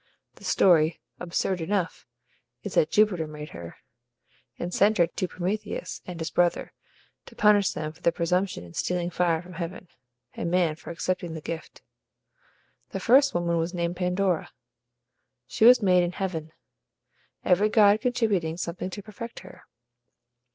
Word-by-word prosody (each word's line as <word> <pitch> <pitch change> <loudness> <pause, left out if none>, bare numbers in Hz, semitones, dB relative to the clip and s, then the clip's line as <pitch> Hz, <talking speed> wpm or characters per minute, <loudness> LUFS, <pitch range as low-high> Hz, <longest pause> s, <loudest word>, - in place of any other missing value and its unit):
The - - -16
story 160 -3 +3 0.2
(absurd 180 +1 -1
enough!) 180 -3 -2 0.6
is - - -5
that 155 - +3
Jupiter 190 -6 +2
made 150 0 -8
her, 85 0 -9 0.8
and 175 +1 -4
sent 210 +2 +3
her 170 - +5
to 180 +2 -4
Prometheus 185 +5 -4
and 180 -2 -7
his 160 - -4
brother, 175 -1 +1 0.5
to - - -14
punish 205 -2 +4
them 155 0 -4
for 160 +3 -21
their 170 - +3
presumption 180 - -1
in 85 -1 -13
stealing 180 - -1
fire 170 -2 +1
from 180 +1 -12
heaven; 180 +1 -6 0.4
and - - -3
man, 175 -3 +2
for - - -12
accepting 170 0 -3
the - - -5
gift. 165 +1 -7 1.1
The - - -4
first 275 +1 +4
woman 170 -1 +1
was 170 +3 -2
named 170 0 -1
Pandora. 180 -1 0 1.0
She 220 - +1
was 245 -1 +8
made 180 -2 +5
in 175 0 -1
heaven, 165 -5 -4 0.9
every 195 +4 +3
god 210 -1 +5
contributing 210 -10 0
something 175 +1 -4
to 205 +2 -8
perfect 220 +3 -9
her. 185 - -14
180 Hz, 150 wpm, -26 LUFS, 165-195 Hz, 1.1 s, was